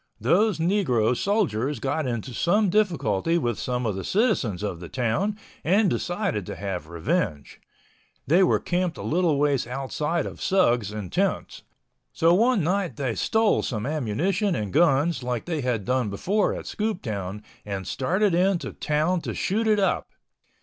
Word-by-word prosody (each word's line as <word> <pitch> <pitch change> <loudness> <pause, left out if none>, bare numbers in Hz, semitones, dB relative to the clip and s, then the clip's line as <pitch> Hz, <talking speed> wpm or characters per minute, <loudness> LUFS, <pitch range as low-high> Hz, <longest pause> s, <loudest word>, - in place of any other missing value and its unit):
Those 185 - +3
negro 160 - +2
soldiers 150 - 0
got 140 +3 -1
into 120 +1 -4
some 195 - +2
difficulty 170 - +1
with 120 -8 -1
some 125 -1 -2
of 105 -4 -1
the 95 - -4
citizens 125 - 0
of 95 -5 -3
the 85 - -9
town 130 - -1 0.3
and 195 +2 +3
decided 175 - -1
to - - -5
have 90 -6 -5
revenge. 85 - -2 0.6
They 170 +6 +4
were 185 - +4
camped 180 -2 -1
a - - -6
little 165 -2 +1
ways 140 -4 +1
outside 145 +5 -2
of - - -8
Sugs 120 - +2
in 105 -4 -6
tents. - - -1 0.5
So 165 +1 +4
one 225 0 +3
night 180 +2 0
they 135 -5 -2
stole 220 - +2
some 110 -3 -3
ammunition 160 - 0
and 105 -3 -3
guns 160 -1 +3
like 125 -2 -3
they 160 -4 -2
had 120 -6 -1
done 125 -3 0
before 195 - 0
at - - -7
Scooptown, 105 - -3 0.2
and 100 -2 -5
started 185 - 0
in 185 +2 +3
to - - -7
town 155 +4 0
to - - -5
shoot 220 +4 0
it 215 -1 +4
up. 195 -1 0
150 Hz, 165 wpm, -25 LUFS, 115-185 Hz, 0.6 s, They